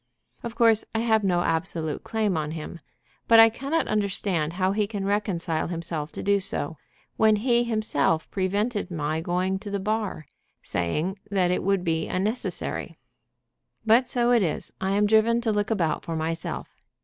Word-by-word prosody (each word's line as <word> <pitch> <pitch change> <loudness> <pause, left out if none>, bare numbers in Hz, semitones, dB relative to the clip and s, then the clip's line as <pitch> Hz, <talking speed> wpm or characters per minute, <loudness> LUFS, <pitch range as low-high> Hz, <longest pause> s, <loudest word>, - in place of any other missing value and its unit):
Of 235 -1 -6
course 230 -2 +4
I - - +2
have 220 -2 +2
no 180 -3 +2
absolute 160 -2 -1
claim 215 -4 0
on 155 -1 -2
him. 165 +1 -7 0.5
But 230 -1 +7
I 225 0 +9
cannot 275 +8 -2
understand 195 -6 -1
how 185 +1 +1
he 205 0 0
can 200 -2 -4
reconcile 190 -6 -1
himself 165 -3 -4
to - - -6
do 200 0 +3
so, 165 -5 -4 0.4
when 220 -1 +5
he 240 +2 +2
himself 215 -9 0
prevented 205 +2 -1
my 155 -2 -2
going 185 +3 -1
to 205 0 -7
the 200 0 -2
Bar, 210 -5 -2 0.4
saying 155 - -2
that 185 -3 +1
it 180 - 0
would 195 -1 +1
be 160 -2 0
unnecessary. 210 +7 -2 0.9
"But 235 +3 +4
so 240 -1 +2
it 240 -2 +5
is, 165 -6 -2
I 190 +1 0
am 205 +1 +3
driven 220 +2 +4
to 230 -2 0
look 205 0 0
about 170 -9 0
for 165 - -4
myself. 165 +1 -4
195 Hz, 170 wpm, -25 LUFS, 165-220 Hz, 0.9 s, I